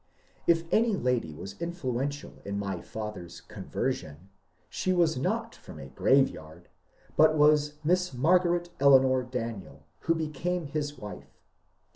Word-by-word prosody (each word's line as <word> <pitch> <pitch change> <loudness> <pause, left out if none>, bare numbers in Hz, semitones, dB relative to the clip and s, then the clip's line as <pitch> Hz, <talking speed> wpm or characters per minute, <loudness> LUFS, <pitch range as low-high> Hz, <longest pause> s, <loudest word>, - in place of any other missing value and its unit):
If 165 -1 +4
any 225 -1 +3
lady 125 - 0
was 95 - -9
influential 145 -5 -4
in 100 0 -4
my 100 -3 -3
father's 105 -6 -7
"conversion," 95 - -5 0.4
she 185 - -1
was 170 -3 +3
not 130 +2 -2
from - - -12
a 65 - -9
graveyard, 80 - +1 0.5
but 155 0 +5
was 150 0 +4
Miss 180 +3 +2
Margaret 175 +5 +2
Eleanor 130 -2 +5
Daniel, 115 - -6
who 165 - +1
became 160 +2 -2
his 145 0 -3
wife. 105 -3 -10
135 Hz, 125 wpm, -28 LUFS, 105-165 Hz, 0.5 s, but